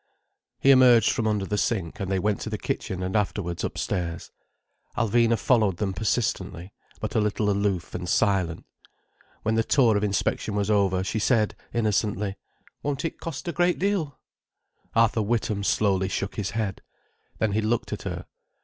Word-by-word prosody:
He 135 - +5
emerged 125 -4 +6
from 115 - -1
under 105 -2 0
the 105 +1 -1
sink, 95 -8 -1
and 95 -1 -3
they 95 - +2
went 105 +2 0
to - - -4
the - - -3
kitchen 90 -1 -3
and 95 +2 -3
afterwards 95 -4 -1
upstairs. 85 -2 -3 0.7
Alvina 115 0 +3
followed 105 -5 +2
them 100 -3 -1
persistently, 95 -4 -2 0.3
but - - -4
a - - +2
little 105 0 +1
aloof, 100 -3 -1
and 90 0 -4
silent. 95 -6 +1 0.8
When 110 - +1
the 115 0 +2
tour 120 -3 +4
of 100 - +1
inspection 105 +1 -1
was 105 +1 0
almost 100 -2 +3
over, 95 - 0
she 105 +4 -2
said 110 -1 +2 0.2
innocently: 105 -3 0 0.5
"Won't 145 +1 -2
it 165 - -4
cost 165 +1 -6
a - - 0
great 175 +1 +2
deal?" 185 -8 -1 0.8
Arthur 115 0 +3
Witham 105 -2 -1
slowly 95 -2 +2
shook 100 0 -3
his 105 -2 -2
head. 105 -4 -2 0.6
Then 110 - +1
he 110 +2 +1
looked 110 +2 -1
at - - -5
her. - - -5
105 Hz, 170 wpm, -26 LUFS, 95-115 Hz, 0.8 s, emerged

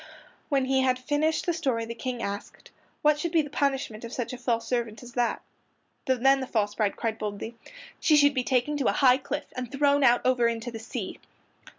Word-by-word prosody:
When 275 -3 +2
he 265 0 +2
had 255 -1 +2
finished 295 +4 0
the 345 - +1
story 260 -8 -1
the 230 - -5
King 245 0 -4
asked, 200 0 -6 0.3
"What 300 0 +4
should 340 +2 -2
be 325 -2 +3
the 290 - -9
punishment 270 -7 -1
of 230 - -7
such 245 -1 -4
a - - -5
false 230 -2 -1
servant 235 -2 -2
as 245 0 -11
that?" 240 -1 0 0.6
Then 265 +1 +4
the 260 - -4
false 205 -4 0
bride 210 -2 0
cried 225 -1 -2
boldly, 210 +2 -4 0.5
"She 310 - +4
should 285 -1 +5
be 255 -2 0
taken 260 +4 +1
to 275 - 0
a - - +3
high 255 -2 +5
cliff 290 +2 -4
and 250 -1 -5
thrown 285 0 +3 0.2
over 250 -2 +3
into 230 +1 -3
the 225 - -7
sea." 225 - -6
255 Hz, 210 wpm, -27 LUFS, 230-280 Hz, 0.6 s, should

